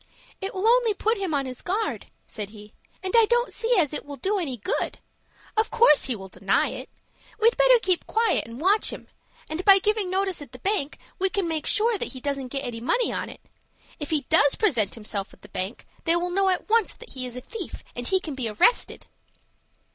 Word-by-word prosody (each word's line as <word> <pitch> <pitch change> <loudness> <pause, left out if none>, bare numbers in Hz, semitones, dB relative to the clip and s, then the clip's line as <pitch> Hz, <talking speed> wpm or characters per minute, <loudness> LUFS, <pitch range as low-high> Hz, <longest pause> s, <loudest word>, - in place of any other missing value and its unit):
"It 390 +1 -4
will 380 +2 -2
only 470 -2 +4
put 445 +2 0
him 380 -4 -2
on 275 -1 0
his 255 -1 -6
guard," 415 +4 -2 0.2
said 210 -2 -6
he, 210 0 -13 0.3
"and 375 - -3
I 460 -1 +7
don't 480 +1 +1
see 460 +1 +1
as 310 -5 +2
it - - -4
will 285 0 -8
do 395 +7 -1
any 275 -8 -3
good. 205 - -2 0.6
Of 440 0 +2
course 465 -10 +5
he 255 - -1
will 195 -2 -9
deny 190 +1 +1
it. - - -7 0.5
We'd 455 +2 +4
better - - +6
keep 370 -5 0
quiet, 450 - +1
and 230 +2 -9
watch 390 +7 +3
him, - - -10 0.4
and, 315 +4 -4
by 395 -1 +8
giving 415 0 0
notice 380 -2 0
at 280 -4 -11
the - - -9
bank, 350 -1 -1 0.2
we 385 +1 +2
can 390 -3 -1
make 320 -2 -2
sure 440 0 +2
that - - -3
he 260 - -8
doesn't 275 -1 -3
get 275 +2 -3
any 230 -2 -5
money 475 - +1
on - - -3
it. - - -12 0.6
If 295 - -5
he 310 -2 +1
does 290 -2 +3
present 240 - +1
himself 210 -3 -5
at - - -34
the - - -13
bank, 190 +5 -5 0.2
they 330 0 +3
will 350 +1 -1
know 390 +1 +2
at 365 - -1
once 450 -2 +2
that 475 - -12
he 255 -1 -4
is 245 - -9
a - - -4
thief, 380 - -7
and 245 0 -3
he 380 - +3
can 320 -5 -6
be 255 -4 -3
arrested." 215 - +2
355 Hz, 225 wpm, -25 LUFS, 255-425 Hz, 0.6 s, by